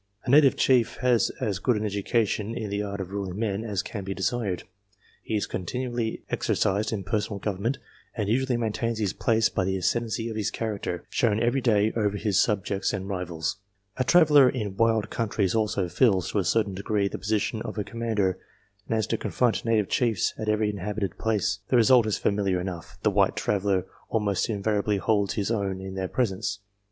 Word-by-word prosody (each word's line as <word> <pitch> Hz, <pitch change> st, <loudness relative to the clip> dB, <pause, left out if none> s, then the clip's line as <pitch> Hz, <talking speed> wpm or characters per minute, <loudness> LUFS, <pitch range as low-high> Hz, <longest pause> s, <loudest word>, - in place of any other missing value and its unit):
A 125 Hz, -, 0 dB
native 140 Hz, -1 st, +6 dB
chief 125 Hz, -4 st, +3 dB
has 125 Hz, -2 st, +3 dB
as 100 Hz, -4 st, -1 dB
good 120 Hz, +4 st, +2 dB
an 105 Hz, -, -2 dB
education 105 Hz, +1 st, 0 dB
in 110 Hz, -4 st, -4 dB
the 100 Hz, 0 st, -1 dB
art 100 Hz, -1 st, -4 dB
of 95 Hz, -1 st, -5 dB
ruling 100 Hz, -2 st, -4 dB
men 105 Hz, -1 st, -1 dB
as 105 Hz, -3 st, -2 dB
can 105 Hz, -3 st, -6 dB
be 95 Hz, 0 st, -4 dB
desired; 100 Hz, -2 st, -1 dB, 0.6 s
he 110 Hz, -, -3 dB
is 105 Hz, -, 0 dB
con -, -, -4 dB
tinually 120 Hz, +2 st, -3 dB
exercised 105 Hz, +3 st, 0 dB
in 105 Hz, -3 st, -3 dB
personal 105 Hz, +1 st, -2 dB
government, 105 Hz, +6 st, -2 dB, 0.4 s
and 105 Hz, -4 st, -2 dB
usually 125 Hz, +3 st, +1 dB
maintains 115 Hz, 0 st, -1 dB
his 105 Hz, -4 st, -1 dB
place 110 Hz, -1 st, +2 dB
by 100 Hz, -, -1 dB
the 95 Hz, +1 st, 0 dB
ascendency 115 Hz, +4 st, -1 dB
of 115 Hz, -, -5 dB
his 105 Hz, -2 st, -1 dB
character, 100 Hz, -6 st, -3 dB
shown 110 Hz, -3 st, +2 dB
every 120 Hz, +4 st, +1 dB
day 110 Hz, -3 st, +2 dB
over 105 Hz, -2 st, 0 dB
his 105 Hz, -2 st, +2 dB
subjects 100 Hz, -2 st, 0 dB
and 95 Hz, +1 st, -4 dB
rivals. 90 Hz, -3 st, -3 dB, 0.4 s
A 130 Hz, -, +2 dB
traveller 150 Hz, -3 st, +6 dB
in 105 Hz, -7 st, -3 dB
wild 115 Hz, 0 st, +2 dB
countries 105 Hz, -4 st, 0 dB
also 105 Hz, -4 st, 0 dB
fills, 95 Hz, -2 st, +2 dB
to 105 Hz, -, +1 dB
a -, -, +1 dB
certain 105 Hz, +3 st, +1 dB
degree, 100 Hz, +1 st, 0 dB
the -, -, -5 dB
posi 105 Hz, +1 st, +1 dB
tion 110 Hz, +2 st, -3 dB
of -, -, -6 dB
a 105 Hz, -, 0 dB
commander, 105 Hz, -5 st, -1 dB, 0.5 s
and 115 Hz, -, 0 dB
has 110 Hz, -2 st, +1 dB
to -, -, -1 dB
confront 125 Hz, -3 st, 0 dB
native 110 Hz, -3 st, +2 dB
chiefs 115 Hz, -5 st, +1 dB
at 110 Hz, -, -3 dB
every 105 Hz, 0 st, +2 dB
inhabited 100 Hz, -1 st, -4 dB
place. 105 Hz, -3 st, 0 dB
The 125 Hz, -, +4 dB
result 120 Hz, 0 st, +5 dB
is 110 Hz, -, 0 dB
familiar 100 Hz, -3 st, +1 dB
enough 90 Hz, -2 st, -6 dB
the -, -, +3 dB
white -, -, +2 dB
traveller 100 Hz, -2 st, 0 dB, 0.2 s
almost 105 Hz, -3 st, 0 dB
invariably 105 Hz, -1 st, 0 dB
holds 100 Hz, -1 st, +1 dB
his 105 Hz, +1 st, -1 dB
own 100 Hz, -4 st, -1 dB
in 95 Hz, 0 st, -7 dB
their 95 Hz, -1 st, -2 dB
presence. 100 Hz, -3 st, -1 dB
105 Hz, 195 wpm, -26 LUFS, 100-115 Hz, 0.6 s, native